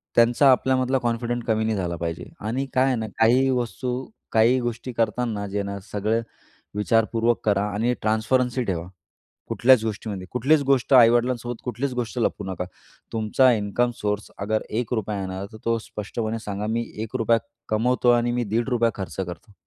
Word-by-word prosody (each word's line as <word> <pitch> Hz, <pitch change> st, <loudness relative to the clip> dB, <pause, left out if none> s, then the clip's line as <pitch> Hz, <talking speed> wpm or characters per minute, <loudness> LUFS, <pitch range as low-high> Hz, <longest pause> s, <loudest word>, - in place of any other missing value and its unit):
त्यांचा 120 Hz, +4 st, +5 dB
आपल्यामधला 130 Hz, +1 st, +2 dB
कॉन्फिडंट 120 Hz, 0 st, -1 dB
कमी 110 Hz, -1 st, +2 dB
नाही 110 Hz, 0 st, 0 dB
झाला 90 Hz, -3 st, -2 dB
पाहिजे 85 Hz, -2 st, -4 dB, 0.2 s
आणि 130 Hz, +5 st, -1 dB
काय 130 Hz, +1 st, +4 dB
आहे 130 Hz, -, +2 dB
ना, 110 Hz, -2 st, -2 dB
काही 125 Hz, +4 st, +4 dB
वस्तू, 125 Hz, +1 st, -2 dB, 0.3 s
काही 115 Hz, +3 st, +4 dB
गोष्टी 120 Hz, +1 st, -4 dB
करताना, 115 Hz, -2 st, -1 dB
जे 100 Hz, +1 st, -2 dB
ना, 100 Hz, 0 st, -5 dB
सगळं 110 Hz, +3 st, 0 dB, 0.5 s
विचारपूर्वक 115 Hz, +2 st, +2 dB
करा 100 Hz, -2 st, +3 dB
आणि 115 Hz, +4 st, +1 dB
ट्रान्स्परन्सी 125 Hz, +4 st, +1 dB
ठेवा. 90 Hz, -5 st, -3 dB, 0.6 s
कुठल्याच 130 Hz, -1 st, +5 dB
गोष्टीमध्ये 105 Hz, -3 st, -4 dB
कुठलीच 140 Hz, +5 st, +3 dB
गोष्ट 135 Hz, 0 st, +2 dB
आई-वडिलांसोबत 120 Hz, 0 st, +4 dB
कुठलीच 125 Hz, +3 st, -2 dB
गोष्ट 125 Hz, 0 st, -3 dB
लपवू 110 Hz, -3 st, 0 dB
नका. 90 Hz, -1 st, -3 dB, 0.5 s
तुमचा 115 Hz, +4 st, +3 dB
इन्कम 110 Hz, +3 st, 0 dB
सोर्स, 105 Hz, 0 st, -2 dB
अगर 110 Hz, +2 st, -1 dB, 0.2 s
1 120 Hz, -1 st, -5 dB
रुपया 105 Hz, -2 st, -2 dB
येणार, 95 Hz, +1 st, -4 dB
तर -, -, -9 dB
तो 115 Hz, 0 st, +1 dB
स्पष्टपणे 110 Hz, +1 st, -4 dB
सांगा, 100 Hz, 0 st, -3 dB
मी 115 Hz, +2 st, -1 dB, 0.2 s
1 115 Hz, +3 st, -4 dB
रुपया 115 Hz, -1 st, +3 dB, 0.3 s
कमवतो 120 Hz, +3 st, +2 dB
आणि 120 Hz, 0 st, +3 dB
मी 120 Hz, 0 st, 0 dB
दीड 115 Hz, +4 st, -1 dB
रुपया 120 Hz, -2 st, +2 dB
खर्च 95 Hz, -5 st, -6 dB
करतो. 95 Hz, +4 st, -7 dB
115 Hz, 165 wpm, -24 LUFS, 105-125 Hz, 0.6 s, त्यांचा